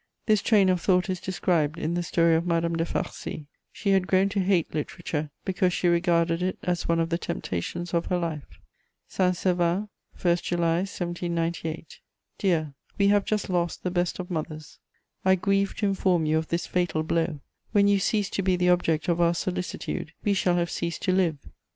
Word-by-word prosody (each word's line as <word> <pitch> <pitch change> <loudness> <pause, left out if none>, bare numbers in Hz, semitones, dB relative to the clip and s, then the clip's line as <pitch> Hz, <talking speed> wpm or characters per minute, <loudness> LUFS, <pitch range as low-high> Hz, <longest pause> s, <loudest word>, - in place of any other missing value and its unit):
This 215 -3 +3
train 205 -4 +4
of 180 -1 +1
thought 185 0 +2
is 185 - -3
described 170 -4 0
in 165 0 -2
the 175 - 0
story 170 -1 +2
of 160 +1 +2
Madame 170 0 +1
de 165 0 0
Farcy; 155 - -4 0.3
she 200 - -1
had 190 -1 +3
grown 190 +1 +3
to 200 0 -1
hate 185 -3 +1
literature, 155 0 -3 0.2
because 185 -1 +1
she 175 - +1
regarded 170 -1 +2
it 185 +1 -1
as 175 -2 -1
one 170 0 +2
of 165 0 0
the 170 0 0
temptations 170 - -4
of 170 0 0
her 180 - +1
life. 155 - -5 0.5
"SAINT 185 -1 +1
SERVAN, 180 +3 +1 0.3
1 175 -1 +3
July 170 -1 0
1798. 170 -3 -3 0.4
"Dear, 160 -7 +1 0.2
we 200 0 +4
have 205 -1 +3
just 210 -2 -1
lost 175 -2 -1
the 180 - -1
best 175 -1 0
of 185 0 -6
mothers: 155 -2 -5 0.4
I 190 0 +5
grieve 195 +1 +1
to 215 - -1
inform 185 -4 +1
you 155 +1 +2
of 160 - -5
this 170 0 -1
fatal 175 -3 0
blow. 160 -2 -1 0.3
When 200 -1 +4
you 200 -1 +4
cease 205 +1 0
to - - -1
be 185 -1 +2
the 180 0 +2
object 165 -3 +2
of 175 -1 +1
our 170 0 +3
solicitude, 175 -2 -4
we 205 - +2
shall 180 -2 +2
have 170 -1 0
ceased 170 -1 -3
to - - +2
live. 180 -5 +2
175 Hz, 195 wpm, -26 LUFS, 165-185 Hz, 0.5 s, I